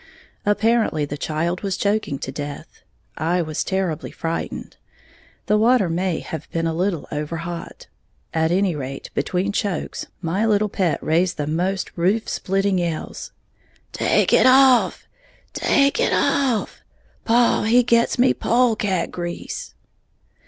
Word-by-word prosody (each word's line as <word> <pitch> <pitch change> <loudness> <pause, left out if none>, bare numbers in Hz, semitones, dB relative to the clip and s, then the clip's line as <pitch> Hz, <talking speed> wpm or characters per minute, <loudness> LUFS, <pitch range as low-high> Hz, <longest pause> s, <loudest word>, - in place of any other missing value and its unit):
Apparently 215 -7 +2
the 145 - -5
child 160 +4 -2
was 195 -2 -2
choking 200 -8 0
to 130 - -5
death, 145 0 -7 0.4
I 170 +3 +1
was 155 -1 -3
terribly 190 -5 -2
frightened, 165 0 -5 0.7
the 210 0 +2
water 225 -5 +3
may 175 0 -1
have 160 -2 -7
been 165 0 -2
a 165 - 0
little 175 0 -1
over 150 +3 -3
hot. 170 +1 -7 0.5
At 160 0 +1
any 185 -1 +1
rate, 135 -1 -6
between 185 +3 -1
chokes, 200 -4 -3
my 180 +4 -1
"little 210 -1 +2
pet" 185 -5 0
raised 170 +3 +1
the 150 - -2
most 180 +5 -1
roof 195 +6 +1
splitting 195 0 0
yells. 170 -3 -4 0.6
"Take - - +2
it - - +6
off! 260 -1 +5 0.5
Take 280 +6 +2
it 485 - +2
off! 255 -6 0 0.4
Paw 235 +1 +3
he 240 +3 +5
gits 235 0 +2
me 250 +2 +4
pole 240 -1 +2
cat 195 -4 -1
grease!" 175 -1 -6
185 Hz, 140 wpm, -22 LUFS, 165-215 Hz, 0.7 s, it